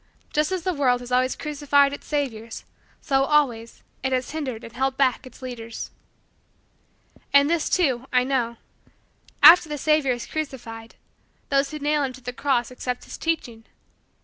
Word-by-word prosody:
Just 300 +3 +1
as 370 -3 -2
the 370 - 0
world 255 -5 +2
has 245 0 -9
always 255 +1 +2
crucified 285 -2 +2
its - - -9
saviors, 235 -7 -3 0.4
so, 270 -2 +2
always, 255 -7 0 0.2
it 265 - -1
has 255 -1 -1
hindered 265 -7 -4
and 230 - -10
held 265 +2 -1
back 265 0 +1
its 255 - -15
leaders. 230 -3 -7 1.4
And 280 0 +6
this, 330 0 0
too, 265 -8 +1
I 250 -1 +3
know: 245 -3 -1 0.9
after 335 -2 +9
the 300 - -3
savior 300 -2 +2
is 240 - -6
crucified, 230 -7 -6 0.5
those 275 0 +2
who 305 - -6
nail 295 0 0
him 270 -2 -2
to 260 - -13
the 250 0 -6
cross 255 -2 0
accept 250 0 -4
his - - -10
teaching. 250 -9 -2
265 Hz, 165 wpm, -24 LUFS, 245-295 Hz, 1.4 s, after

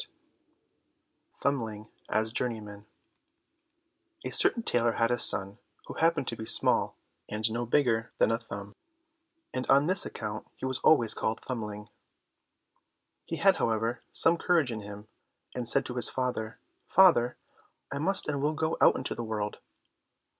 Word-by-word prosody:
45 - - -30
Thumbling 110 -6 -2 0.2
as 110 0 0
Journeyman 110 -4 -3 1.4
A - - -3
certain 230 - +5
tailor 120 - +2
had 115 +1 +1
a 120 - 0
son, 100 -2 +3 0.3
who - - -8
happened 165 -4 +1
to 115 - -5
be 110 - -8
small, - - +3 0.3
and 105 +1 0
no 120 +1 -3
bigger 115 -4 +1
than - - +2
a 115 - -1
Thumb, 100 -3 -9 0.8
and 130 - -4
on 140 +2 +4
this 185 +4 +2
account 105 0 -6
he - - -7
was 130 -1 -2
always 120 -8 +4
called 110 - -3
Thumbling. 105 -4 -6 1.4
He 165 - -4
had, 195 +3 +3
however, 115 +1 -1
some 170 +1 +3
courage 165 -9 +1
in 110 -2 -5
him, 105 +1 -10 0.5
and 120 -2 -4
said 135 +1 +1
to 125 - -6
his 125 -2 +3
father, 125 -3 -3 0.3
"Father, 165 -11 +4 0.6
I 140 - -3
must 190 +6 +2
and 145 -2 -2
will 150 +2 0
go 160 +1 -2
out - - +5
into 130 - -2
the 120 - -6
world." 105 -2 -4
120 Hz, 155 wpm, -28 LUFS, 110-140 Hz, 1.4 s, certain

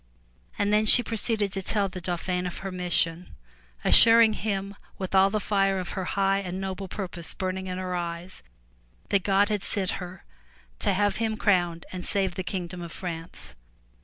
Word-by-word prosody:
And 205 0 0
then 215 +1 +3
she 245 - +7
proceeded 220 -3 +1
to 195 - -3
tell 200 +1 +1
the 185 -1 -8
Dauphin 180 +1 -2
of 175 - -7
her 195 - -3
mission, 180 -1 0 0.5
assuring 230 -1 +8
him 200 -2 -3 0.2
with 190 -1 -5
all 190 0 +5
the 215 +1 -1
fire 195 -2 +1
of 185 -1 -4
her 190 -2 -4
high 195 0 +1
and 185 -1 -5
noble 190 0 -5
purpose 180 -4 -6
burn 185 -1 -2
ing 190 - -7
in 180 0 -4
her 185 -1 -4
eyes, 175 +1 -5 0.7
that 200 - +2
God 200 +2 +2
had 210 -2 -1
sent 195 -2 -1
her 180 +1 -9 0.6
to 205 - +1
have 205 +2 +1
him 220 -1 -1
crowned 175 -5 +1
and 185 -1 -6
save 195 -3 -1
the 185 - -4
kingdom 180 -1 -5
of 170 -1 -7
France. 165 -2 -8
190 Hz, 185 wpm, -26 LUFS, 180-200 Hz, 0.7 s, assuring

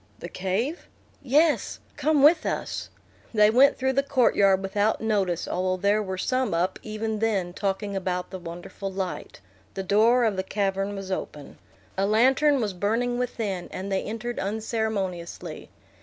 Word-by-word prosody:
"The 170 - -8
cave?" 200 - -2 0.3
"Yes. 295 +4 +2 0.2
Come 305 -2 +2
with 310 +2 +6
us." - - -3 0.5
They 210 0 +6
went 265 +4 +5
through 265 0 0
the 275 - +3
court 275 -3 +2
yard 195 -1 +4
without 205 +3 +1
notice, 195 -6 0
although 185 0 -1
there 200 +3 +2
were 190 -2 -4
some 255 -1 0
up 175 +2 0
even 215 0 -3
then 200 -5 0
talking 200 +1 -2
about 180 -1 -2
the 190 - -6
wonderful 175 +3 -7
light. 190 - -5 0.3
The 195 - -3
door 225 +6 +4
of 215 -4 +1
the 190 - 0
cavern 195 0 -1
was 195 -1 -6
open. 150 -6 -6 0.4
A 195 - +2
lantern 265 +6 +4
was 210 -5 -1
burning 230 +6 0
within, 215 -7 -3
and 195 +2 -6
they 190 - +1
entered 230 +3 -4
unceremoniously. 205 -4 -3
205 Hz, 155 wpm, -26 LUFS, 190-235 Hz, 0.5 s, with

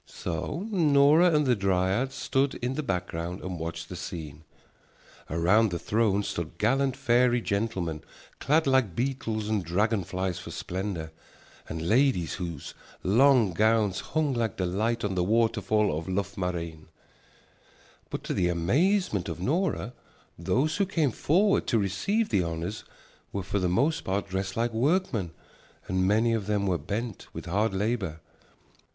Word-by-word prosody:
So 150 - -4
Nora 155 -2 +5
and 150 -2 +3
the 125 -2 +3
dryad 100 +5 +1
stood 135 0 0
in 125 +2 -2
the 150 - -2
background 90 - -3
and 90 -2 -5
watched 85 +1 -5
the 90 - -7
scene. 80 -4 -7 0.9
Around 95 +8 +3
the 85 - -2
throne 105 +1 +1
stood 85 -3 -4
gallant 135 +3 +1
fairy 125 -2 +3
gentlemen 100 -8 -2 0.4
clad 155 +3 +2
like 130 -10 +2
beetles 115 -4 -2
and 105 -3 0
dragon 100 +5 +1
flies 95 0 -3
for - - -9
splendor 90 -4 -4 0.6
and 80 +1 -4
ladies 120 - +2
whose 85 -5 -5 0.3
long 120 0 +4
gowns 105 0 +2
hung 150 -2 -1
like 115 -4 -1
the 95 - 0
light 110 +6 -1
on 105 -2 -1
the 90 -1 +1
waterfall 105 -3 +2
of 80 +1 -5
Loughmareen. 90 -4 -3 1.2
But - - -5
to - - -3
the 90 - +1
amazement 110 - +1
of 85 0 -5
Nora, 150 - -1 0.4
those 120 - 0
who 200 -2 +1
came 160 -7 +1
forward 195 - +2
to 115 - +2
receive 110 - 0
the 100 -4 +2
honors 85 +5 -4 0.5
were 100 - -3
for 100 +2 -1
the 90 -1 +1
most 155 - +1
part 95 +2 -1
dressed 95 +1 -3
like 115 0 0
workmen 125 - +1 0.6
and 95 0 +1
many 110 +3 +3
of 105 -3 -2
them 105 -1 +1
were 90 -3 +1
bent 110 +9 -4
with - - -7
hard 100 +4 0
labor. 100 -6 -1
105 Hz, 150 wpm, -27 LUFS, 90-130 Hz, 1.2 s, Nora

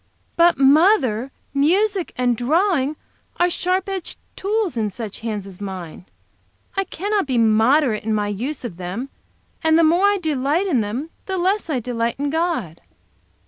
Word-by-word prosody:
"But, 340 0 +4
mother, 275 - +4 0.2
music 370 +7 +2
and 245 -1 +1
drawing 305 - +1 0.4
are 355 0 +2
sharp 365 +2 0
edged 385 -3 -5 0.2
tools 410 - -1
in 220 -2 0
such 210 0 -7
hands 215 -3 -4
as 195 -1 -12
mine. 180 - -7 0.7
I 390 - 0
cannot 400 0 -1
be 255 -3 0
moderate 225 +2 +3
in 220 - -2
my 210 -1 0
use 250 +8 -4
of 190 -8 -6
them. 190 +9 -5 0.5
And 320 0 +4
the 335 - +5
more 345 +5 +4
I 405 0 +3
delight 310 +1 0
in 285 - +2
them, 245 +10 -4 0.2
the 380 -1 -2
less 375 +1 0
I 275 -5 0
delight 235 -1 -2
in 285 +1 -2
God." 315 - -2
280 Hz, 160 wpm, -21 LUFS, 225-355 Hz, 0.7 s, the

